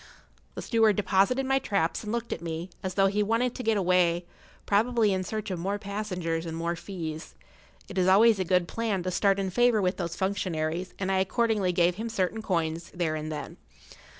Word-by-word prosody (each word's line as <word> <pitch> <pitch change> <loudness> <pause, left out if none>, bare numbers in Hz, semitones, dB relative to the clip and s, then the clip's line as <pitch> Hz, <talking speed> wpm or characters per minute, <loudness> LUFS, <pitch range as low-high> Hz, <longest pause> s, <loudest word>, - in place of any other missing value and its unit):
The - - -5
steward 225 -3 +3
deposited 210 +7 +2
my 270 0 +2
traps 195 -9 -1
and 210 - -4
looked 235 0 -2
at - - -7
me, 170 +2 -5
as 185 -1 -4
though 195 - +4
he 200 +2 +1
wanted 230 +4 +1
to - - -6
get 225 -3 +1
away—probably 190 +5 +1
in 185 0 -1
search 215 +1 -4
of 180 - -3
more 195 +4 -1
passengers 180 -5 -3
and 165 0 -4
more 170 +1 -1
fees. 165 -4 -7 0.5
It 195 - -3
is 180 - +3
always 210 +3 +6
a - - +2
good[Pg 175 - -12
15] - - -8
plan 210 -2 -2
to 185 - -2
start 195 +2 +2
in 190 -1 -2
favour 240 +1 +3
with 185 -1 0
those 170 -2 -3
functionaries, 180 -2 -2
and 190 0 -2
I 190 - +2
accordingly 210 -1 +1
gave 175 0 +2
him 225 +2 -4
certain 220 0 -1
coins 170 -4 -2
there 170 -3 0
and 155 0 -4
then. 150 - -6
190 Hz, 205 wpm, -27 LUFS, 170-215 Hz, 0.5 s, always